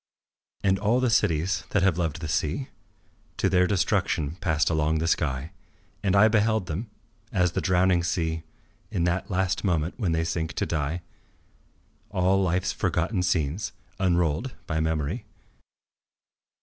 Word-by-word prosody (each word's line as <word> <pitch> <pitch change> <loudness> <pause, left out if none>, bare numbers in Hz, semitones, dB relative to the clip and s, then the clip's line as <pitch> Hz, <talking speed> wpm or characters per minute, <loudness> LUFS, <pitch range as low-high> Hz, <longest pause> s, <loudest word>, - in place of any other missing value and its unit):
And 95 -1 +3
all 110 +5 +2
the 130 -2 +2
cities 90 -6 +1
that 105 - +1
have 95 -3 +2
loved 85 -1 -1
the 80 - -3
sea 75 - -1 0.7
To - - +2
their 90 -1 +3
destruction, 80 -6 +1
passed 80 -3 +1
along 80 0 +1
the 80 - -1
sky, 70 -2 0 0.5
And 100 -1 +1
I 105 +2 +7
beheld 110 -2 +2
them, 90 +7 -4 0.4
as 90 -4 +2
the - - -1
drowning 90 -1 +3
see, 80 -1 -1 0.5
In 85 - -1
that 90 +2 0
last 95 -1 0
moment 85 0 0
when 95 -7 +1
they 80 0 +1
sink 80 -1 -2
to - - -1
die, 80 +2 -2 1.1
All 95 +2 +2
life's 95 +1 +1
forgotten 90 0 0
scenes 90 0 0 0.3
unrolled 90 - +1
by 80 -1 -1
memory. 80 - -1
90 Hz, 145 wpm, -26 LUFS, 80-95 Hz, 1.1 s, I